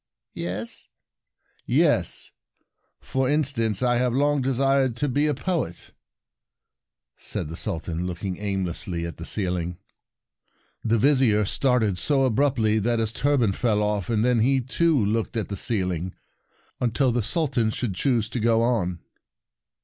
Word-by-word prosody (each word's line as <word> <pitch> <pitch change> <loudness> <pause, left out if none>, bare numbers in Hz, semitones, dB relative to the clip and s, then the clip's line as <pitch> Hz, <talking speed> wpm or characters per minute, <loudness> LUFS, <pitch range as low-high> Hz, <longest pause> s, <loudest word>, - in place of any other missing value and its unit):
"Yes?" 95 +7 -3 0.4
" - - -42 0.2
Yes. - - +1 0.7
For 130 -1 -1
instance, 130 -8 +1
I 120 -1 +3
have 125 -1 +1
long 145 +2 +2
desired 135 -1 +2
to 145 - 0
be 145 +3 +1
a 150 - 0
poet," 155 - -3 1.3
said - - -4
the 80 - -6
Sultan, 85 -2 -3
looking 90 +1 -4
aimlessly 95 -3 -3
at 85 - -7
the 85 - -7
ceiling. 90 -3 -2 1.1
The 115 0 +2
Vizier 125 -4 +3
started 110 -5 +1
so 140 -2 +2
abruptly 120 -4 +2
that 115 +3 +1
his 110 -1 -1
turban 130 -5 +2
fell 105 0 +1
off, 105 -3 -1
and 110 -1 +1
then 125 -2 +3
he, 135 +4 +3
too, 135 0 +1
looked 110 +2 -1
at 110 - -2
the 100 - -3
ceiling, 95 -5 -1 0.6
until 125 +2 +1
the 120 0 0
Suhan 130 - 0
should 110 -2 -3
choose 115 +2 +1
to 125 - -2
go 115 0 +3
on. 90 -8 0
115 Hz, 140 wpm, -24 LUFS, 100-130 Hz, 1.3 s, I